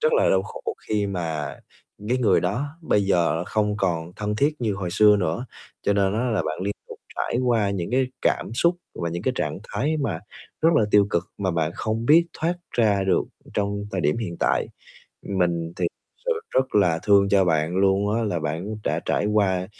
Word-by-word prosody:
rất 470 Hz, +1 st, +2 dB
là 485 Hz, -, +4 dB
đau -, -, +3 dB
khổ -, -, -9 dB, 0.3 s
khi 105 Hz, -1 st, +1 dB
mà 80 Hz, -6 st, -3 dB, 0.5 s
cái 125 Hz, -, +2 dB
người 120 Hz, -4 st, +3 dB
đó 105 Hz, +11 st, -1 dB, 0.2 s
bây 105 Hz, -9 st, +2 dB
giờ 85 Hz, -3 st, +2 dB
không 105 Hz, 0 st, 0 dB
còn 85 Hz, -3 st, -1 dB
thân 105 Hz, 0 st, -2 dB
thiết 145 Hz, +4 st, +1 dB
như 110 Hz, -4 st, 0 dB
hồi 95 Hz, -3 st, -4 dB
xưa 105 Hz, +2 st, +6 dB
nữa. 90 Hz, +6 st, -1 dB, 0.4 s
Cho 100 Hz, -, +2 dB
nên 100 Hz, 0 st, +2 dB
á, 115 Hz, +3 st, 0 dB
là 110 Hz, -, +1 dB
bạn 80 Hz, +3 st, -4 dB
liên 100 Hz, +1 st, -2 dB
tục -, -, -9 dB, 0.2 s
trải 120 Hz, -, -1 dB
qua 110 Hz, -4 st, +2 dB
những 95 Hz, -1 st, -3 dB
cái 130 Hz, +1 st, +2 dB, 0.2 s
cảm -, -, 0 dB
xúc 170 Hz, +7 st, +2 dB, 0.2 s
và 85 Hz, -1 st, -3 dB
những 85 Hz, +1 st, -4 dB
cái -, -, +1 dB
trạng -, -, -2 dB
thái 155 Hz, +3 st, 0 dB
mà 140 Hz, -, -2 dB, 0.4 s
rất 165 Hz, -, +6 dB
là 110 Hz, -, +4 dB
tiêu 100 Hz, -1 st, +5 dB
cực, 85 Hz, +1 st, 0 dB
mà 95 Hz, -2 st, 0 dB
bạn 80 Hz, -2 st, 0 dB
không 110 Hz, +1 st, -2 dB
biết 165 Hz, +4 st, +6 dB
thoát 170 Hz, +2 st, 0 dB, 0.2 s
ra 105 Hz, -4 st, +2 dB
được 95 Hz, -, +2 dB, 0.3 s
trong 100 Hz, 0 st, -1 dB
thời 95 Hz, -, -1 dB
điểm 75 Hz, -2 st, +1 dB
hiện 90 Hz, -7 st, -4 dB
tại. -, -, +2 dB, 0.6 s
Mình 85 Hz, -3 st, 0 dB
thì 90 Hz, -, 0 dB
thực -, -, -12 dB
sự -, -, +1 dB, 0.2 s
rất 130 Hz, 0 st, 0 dB
là 90 Hz, -6 st, +4 dB
thương 100 Hz, -1 st, +4 dB
cho 100 Hz, -1 st, +4 dB
bạn 80 Hz, 0 st, +1 dB
luôn 100 Hz, +2 st, +2 dB
á, 115 Hz, -, 0 dB
là 100 Hz, -5 st, -1 dB
bạn 80 Hz, +8 st, -3 dB
đã -, -, 0 dB
trải -, -, +1 dB
qua 95 Hz, -4 st, +1 dB
100 Hz, 210 wpm, -24 LUFS, 90-110 Hz, 0.6 s, xưa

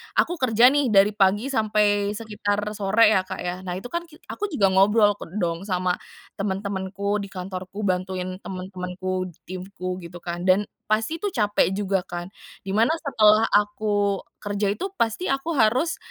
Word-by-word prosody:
aku 350 Hz, 0 st, +1 dB
kerja 245 Hz, 0 st, +5 dB
nih 290 Hz, -2 st, +2 dB
dari 205 Hz, -1 st, +5 dB
pagi 205 Hz, +6 st, +2 dB
sampai 210 Hz, -3 st, +2 dB
sekitar 205 Hz, -2 st, -2 dB
sore 215 Hz, +2 st, +4 dB
ya, 185 Hz, -3 st, +2 dB
Kak, -, -, -6 dB
ya. 180 Hz, +1 st, -3 dB
Nah, 180 Hz, -1 st, -5 dB
itu 220 Hz, +7 st, -7 dB
kan 340 Hz, 0 st, -3 dB
ki 310 Hz, -, -16 dB, 0.2 s
aku 420 Hz, -, -3 dB
juga 205 Hz, -, +2 dB
ngobrol 205 Hz, +2 st, +4 dB
ke -, -, -8 dB
dong, 175 Hz, -1 st, -2 dB
sama 185 Hz, -1 st, 0 dB, 0.5 s
temen-temenku 200 Hz, +1 st, -2 dB
di 200 Hz, -, -5 dB
kantorku, 185 Hz, +2 st, -6 dB
bantuin 185 Hz, 0 st, -2 dB
temen-temenku 185 Hz, 0 st, -4 dB
di 170 Hz, -, -15 dB
timku, 185 Hz, 0 st, -6 dB
gitu 175 Hz, 0 st, -10 dB
kan. 175 Hz, +1 st, -4 dB
Dan, 190 Hz, +2 st, +5 dB, 0.2 s
pasti 220 Hz, +10 st, 0 dB
itu 375 Hz, -, -6 dB
capek 205 Hz, -3 st, +2 dB
juga 195 Hz, -2 st, -1 dB
kan. 175 Hz, +1 st, -6 dB, 0.3 s
Dimana, 215 Hz, +9 st, +2 dB
setelah 220 Hz, -6 st, +4 dB
aku 205 Hz, -1 st, +1 dB, 0.2 s
kerja 205 Hz, -1 st, -1 dB
itu, 375 Hz, -, -3 dB
pasti 235 Hz, -, -1 dB
aku 275 Hz, +5 st, -1 dB
harus, 260 Hz, +9 st, +2 dB
205 Hz, 165 wpm, -24 LUFS, 185-215 Hz, 0.5 s, kerja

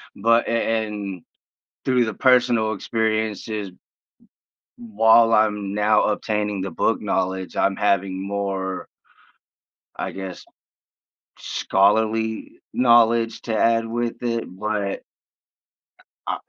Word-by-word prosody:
But 115 Hz, +3 st, +2 dB
a -, -, -2 dB, 0.3 s
and 100 Hz, -4 st, -6 dB, 0.6 s
through 125 Hz, -2 st, +2 dB
the 110 Hz, -3 st, -4 dB
personal 120 Hz, -4 st, +3 dB
experiences, 110 Hz, -2 st, -2 dB, 1.1 s
while 115 Hz, 0 st, +4 dB
I'm 105 Hz, -2 st, +1 dB
now 105 Hz, +1 st, +3 dB
obtaining 105 Hz, -1 st, -1 dB
the 95 Hz, -2 st, -4 dB
book -, -, 0 dB
knowledge, 95 Hz, 0 st, -2 dB
I'm 100 Hz, -, +1 dB
having 95 Hz, -2 st, 0 dB
more 95 Hz, -2 st, -3 dB, 1.1 s
I -, -, -4 dB
guess, 95 Hz, -2 st, -8 dB, 0.9 s
scholarly 110 Hz, +3 st, 0 dB
knowledge 115 Hz, -2 st, +3 dB
to 110 Hz, -2 st, -2 dB
add 115 Hz, +1 st, +2 dB
with 120 Hz, +1 st, -3 dB
it, 115 Hz, -1 st, -1 dB
but 100 Hz, +1 st, -3 dB, 1.2 s
Ah -, -, -2 dB
110 Hz, 100 wpm, -22 LUFS, 100-115 Hz, 1.2 s, while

